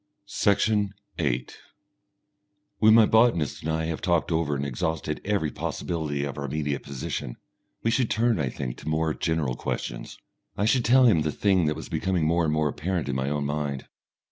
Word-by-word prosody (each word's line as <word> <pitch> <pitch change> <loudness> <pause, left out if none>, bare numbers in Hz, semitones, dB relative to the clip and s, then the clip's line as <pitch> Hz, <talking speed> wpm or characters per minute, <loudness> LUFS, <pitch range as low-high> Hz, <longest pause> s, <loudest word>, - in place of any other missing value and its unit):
Section 100 0 +1 0.2
8 60 +1 -2 1.2
When 110 +1 +7
my 115 -1 +7
botanist 110 -10 +3
and 80 - -2
I 80 0 -1
have 80 -1 -3
talked 85 -1 +1
over 80 -3 +1
and 70 0 -2
exhausted 75 +3 -2
every 100 -7 0
possibility 75 -5 -3
of 70 0 -4
our 70 - -3
immediate 70 0 -2
position, 65 -3 -5 0.5
we 115 - +2
should 120 -1 +1
turn, 115 -3 +2
I 70 -3 0
think, 65 -1 -5
to - - -6
more 80 0 +1
general 80 -7 -1
questions. - - -5 0.4
I 105 - +1
should 120 +2 +2
tell 130 +2 +6
him 95 -10 +5
the 75 0 0
thing 95 -3 +2
that 75 - 0
was 80 - -7
becoming 90 -4 0
more 85 +1 +2
and 75 - +1
more 75 -1 +1
apparent 85 0 -2
in 70 - -1
my 65 +1 -1
own 75 -1 -1
mind. 70 -2 -3
80 Hz, 185 wpm, -26 LUFS, 70-95 Hz, 1.2 s, When